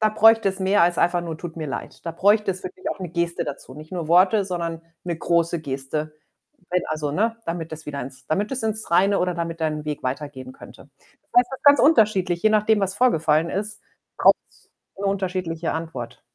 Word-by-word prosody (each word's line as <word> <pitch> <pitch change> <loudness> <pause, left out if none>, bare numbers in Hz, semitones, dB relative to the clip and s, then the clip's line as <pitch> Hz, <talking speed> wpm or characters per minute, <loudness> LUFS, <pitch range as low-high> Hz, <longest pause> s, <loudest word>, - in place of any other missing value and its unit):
da 215 - +4
bräuchte 225 0 +5
es 190 0 -2
mehr 190 0 +3
als 175 0 +2
einfach 175 0 +2
nur: 165 -2 -5
„Tut 170 -1 -8
mir 155 - -4
leid.“ 135 - -7
Da 170 - -2
bräuchte 205 +4 +3
es 185 0 -5
wirklich 185 0 -6
auch - - -5
'ne 185 -2 -5
Geste 170 0 -1
dazu. 135 -2 -7
Nicht 155 +3 -12
nur 170 -4 -4
Worte, 185 +4 +5
sondern 170 -3 -4 0.2
'ne 175 -2 -3
große 170 0 +1
Geste, 150 +2 -4 0.6
wenn 180 0 +1
also, 150 -2 -2
ne? 225 +7 0
Damit 165 -1 -4
das 155 0 -7
wieder 145 -1 -5
ins 130 +1 -9
damit 200 +9 -1
das 265 -3 -2
ins 220 0 -1
Reine 195 +3 +4
oder 180 0 0
damit 165 -1 -4
dein 155 -1 -1
Weg 150 -1 -4
weitergehen 130 0 -5
könnte. - - -14 0.3
Das - - -44
heißt, 245 +1 -1
das 265 - -5
ist - - -47
ganz 285 0 +7
unterschiedlich, 205 - +3
je 215 - +5
nachdem, 215 0 +3
was 195 -1 0
vorgefallen 165 -9 +2
ist, 215 +2 -3 0.4
braucht‘s - - +2 0.3
'ne 200 - -4
unterschiedliche 180 -4 -2
Antwort. 160 -8 -6
175 Hz, 210 wpm, -23 LUFS, 160-200 Hz, 0.6 s, ganz